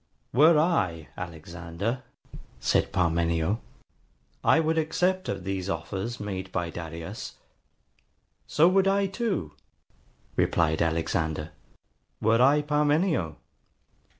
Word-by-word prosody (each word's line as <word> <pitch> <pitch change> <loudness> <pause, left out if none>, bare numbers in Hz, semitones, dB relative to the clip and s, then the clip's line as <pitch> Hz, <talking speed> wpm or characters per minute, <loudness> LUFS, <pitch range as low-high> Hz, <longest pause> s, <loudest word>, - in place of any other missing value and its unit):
]. - - -44
WERE 155 +6 +6
I 95 - +1
Alexander, 85 +6 -5 0.6
said - - +1
Parmenio, 85 +1 +1 0.8
I - - +5
WOULD 160 0 +2
ACCEPT 185 +4 0
OF 95 - -3
THESE 95 0 -3
OFFERS 95 +7 -3
MADE 95 -2 -5
BY 85 -1 -2
DARIUS. 80 -1 -7 1.1
SO 160 +3 +4
WOULD 190 +1 +4
I 200 +1 +3
TOO, 195 - -2 0.8
replied 80 -1 +2
Alexander, 80 -1 -1 0.7
WERE 115 +2 +3
I 140 +3 +5
PARMENIO. 150 - +1
95 Hz, 100 wpm, -27 LUFS, -, 1.1 s, WERE